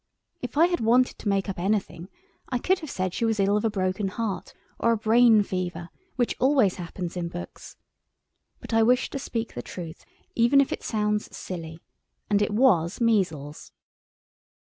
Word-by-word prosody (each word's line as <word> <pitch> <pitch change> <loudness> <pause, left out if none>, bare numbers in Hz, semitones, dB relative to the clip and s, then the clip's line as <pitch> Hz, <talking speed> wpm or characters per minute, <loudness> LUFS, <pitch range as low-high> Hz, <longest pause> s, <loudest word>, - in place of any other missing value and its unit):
If - - -6
I 325 - +7
had 350 0 0
wanted 245 +3 +2
to 210 - -2
make 195 0 0
up 190 -3 -4
anything 190 -2 -2 0.4
I 250 - 0
could 370 +9 +1
have 310 - -8
said 185 -4 -2
she - - -2
was 225 -2 +1
ill 200 +1 +3
of 210 - 0
a 225 - +2
broken 190 0 -1
heart 195 -2 -4 0.3
or 230 - +3
a - - 0
brain 225 0 +5
fever, 175 -3 -4 0.3
which 245 -2 0
always 260 -8 +3
happens 175 0 -6
in 175 -1 -2
books. 175 +1 -9 0.8
But - - -8
I 225 - +4
wish 245 +3 +3
to 275 - -4
speak 230 -3 -4
the 120 - -5
truth 165 +4 -8 0.3
even 240 +4 +4
if 275 - +2
it - - -5
sounds 210 -1 -2
silly. 165 -2 -7 0.5
And 205 0 +3
it 205 - +1
was 205 -7 +3
measles. 175 - -1
210 Hz, 180 wpm, -26 LUFS, 180-230 Hz, 0.8 s, I